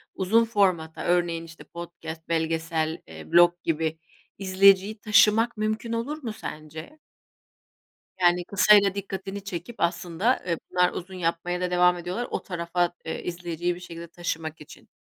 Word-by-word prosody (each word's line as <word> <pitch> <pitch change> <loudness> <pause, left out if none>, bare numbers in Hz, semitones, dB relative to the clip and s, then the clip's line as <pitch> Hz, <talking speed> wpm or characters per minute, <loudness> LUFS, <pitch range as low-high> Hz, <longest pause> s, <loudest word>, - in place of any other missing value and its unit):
uzun 220 +5 +3
formata, 185 -8 0
örneğin, 175 -1 +1
işte, 165 -1 -12
podcast, 170 -1 -9
belgesel, 160 0 -1
eee, 80 -1 -11
blog 175 0 +7
gibi, 160 0 -1 0.4
izleyiciyi 195 +2 +4
taşımak 220 +2 +4
mümkün 215 +2 -2
olur 280 +7 -3
mu 225 -3 -3
sence? 155 - -9 1.2
Yani, 175 0 +3
kısayla 200 0 +5
dikkatini 195 0 -5
çekip 190 +3 -6
aslında, 175 +7 0
eee, 170 -2 0
bunlar 180 0 +3
uzun 185 +1 -7
yapmaya 175 0 -2
da 180 0 -1
devam 180 0 +4
ediyorlar. 180 +8 -4
O - - -2
tarafa, 175 -1 -1
eee, 160 - -4
izleyiciyi 175 0 -3
bir - - -10
şekilde 170 -1 -9
taşımak 160 -2 -5
için. 150 - -14
175 Hz, 140 wpm, -26 LUFS, 165-200 Hz, 1.2 s, blog